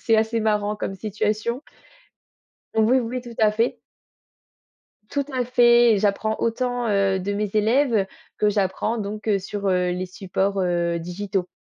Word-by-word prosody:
C'est 225 Hz, -, +3 dB
assez 220 Hz, +1 st, +1 dB
marrant 210 Hz, -1 st, 0 dB
comme 195 Hz, -, -4 dB
situation. 215 Hz, +4 st, -2 dB, 1.1 s
Oui, 225 Hz, +4 st, +4 dB
oui, 250 Hz, +1 st, -3 dB
tout 240 Hz, -1 st, -10 dB
à 215 Hz, -1 st, +5 dB
fait. 225 Hz, +3 st, 0 dB, 1.3 s
Tout 285 Hz, -1 st, -1 dB
à 255 Hz, -1 st, 0 dB
fait 240 Hz, -1 st, +5 dB
et 205 Hz, -, +1 dB
j'apprends 215 Hz, +2 st, 0 dB
autant, 245 Hz, +1 st, -1 dB
heu, 195 Hz, -2 st, +2 dB
de 200 Hz, +2 st, -2 dB
mes 210 Hz, 0 st, -1 dB
élèves 225 Hz, -1 st, +2 dB, 0.3 s
que 210 Hz, -, +3 dB
j'apprends 205 Hz, +3 st, 0 dB
donc, 210 Hz, +1 st, -5 dB
heu, 200 Hz, -, +3 dB
sur, 200 Hz, +1 st, -4 dB
heu, 180 Hz, -1 st, +2 dB
les 185 Hz, +1 st, -3 dB
supports, 195 Hz, +1 st, -2 dB
heu, 175 Hz, -2 st, 0 dB
digitaux 180 Hz, +2 st, -3 dB
210 Hz, 155 wpm, -23 LUFS, 195-230 Hz, 1.3 s, à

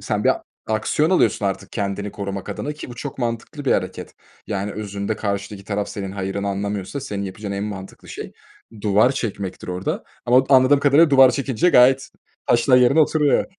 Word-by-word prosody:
Sen -, -, -2 dB
bir -, -, +5 dB, 0.3 s
aksiyon 110 Hz, +9 st, +1 dB
alıyorsun 180 Hz, -, +2 dB
artık 95 Hz, 0 st, -4 dB
kendini 100 Hz, -1 st, -3 dB
korumak 100 Hz, -1 st, -5 dB
adına 145 Hz, +8 st, -4 dB
ki 150 Hz, -3 st, -9 dB
bu -, -, -8 dB
çok 135 Hz, +3 st, -7 dB
mantıklı 120 Hz, +4 st, -4 dB
bir 135 Hz, -, +3 dB
hareket. 90 Hz, -1 st, -3 dB, 0.3 s
Yani, 100 Hz, -1 st, -3 dB
özünde 100 Hz, 0 st, -4 dB
karşıdaki 100 Hz, -1 st, -4 dB
taraf 100 Hz, 0 st, -2 dB
senin 95 Hz, -2 st, -5 dB
hayırını 100 Hz, +1 st, -3 dB
anlamıyorsa 100 Hz, +5 st, -3 dB
senin 105 Hz, -7 st, -4 dB
yapacağın 100 Hz, +1 st, -6 dB
en 100 Hz, +1 st, -3 dB
mantıklı 95 Hz, -2 st, -8 dB
şey -, -, -7 dB, 0.5 s
duvar 105 Hz, +5 st, +3 dB
çekmektir 100 Hz, -8 st, -5 dB
orada 90 Hz, +1 st, -3 dB, 0.2 s
ama 125 Hz, +2 st, +5 dB
anladığım 135 Hz, +1 st, +5 dB
kadarıyla 145 Hz, +3 st, +5 dB
duvar 135 Hz, -2 st, +7 dB
çekince 135 Hz, +3 st, 0 dB
gayet 130 Hz, -1 st, +5 dB, 0.4 s
taşlar 120 Hz, +2 st, +4 dB
yerine 125 Hz, +5 st, +5 dB
oturuyor. 150 Hz, -1 st, +3 dB
105 Hz, 170 wpm, -21 LUFS, 100-130 Hz, 0.5 s, duvar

